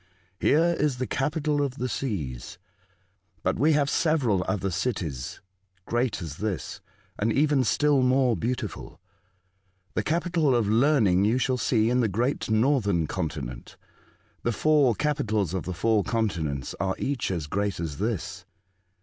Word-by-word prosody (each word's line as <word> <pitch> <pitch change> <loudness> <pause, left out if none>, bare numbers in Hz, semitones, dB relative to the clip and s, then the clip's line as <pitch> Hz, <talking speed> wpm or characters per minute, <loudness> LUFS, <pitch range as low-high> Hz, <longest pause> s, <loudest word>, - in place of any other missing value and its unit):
*' 95 0 -40
Here 170 +3 +4
is 145 -3 +1
the 130 - -1
capital 145 +2 0
of 135 -3 -1
the 125 -2 -2
seas; 85 - -4 0.9
but - - 0
we 155 +4 +4
have 145 -1 +2
several 135 - +1
other 95 -2 -1
cities 85 - -3 0.4
great 120 -5 -1
as 75 -2 -7
this, 105 -4 -4 0.4
and 110 +2 +1
even 140 +2 +3
still 145 +3 +3
more 130 -1 +3
beautiful. 120 +7 -4 0.9
The - - 0
capital 165 -4 +1
of 115 -4 +1
Learning 110 -5 +3
you 110 +4 +2
shall 130 0 0
see 115 -2 +2
in 125 - +2
the 120 - +3
great 120 +8 -1
northern 110 - +2
continent. 70 -9 -5 0.6
The 120 - 0
four 145 -1 +3
capitals 110 - 0
of 95 - -3
the 90 - -3
four 110 +3 +2
continents 80 - -2
are 95 -1 0
each 140 -4 -2
as 85 -6 -2
great 100 +4 -2
as 80 -3 -4
this." 110 -3 -3
115 Hz, 150 wpm, -26 LUFS, 95-140 Hz, 0.9 s, Here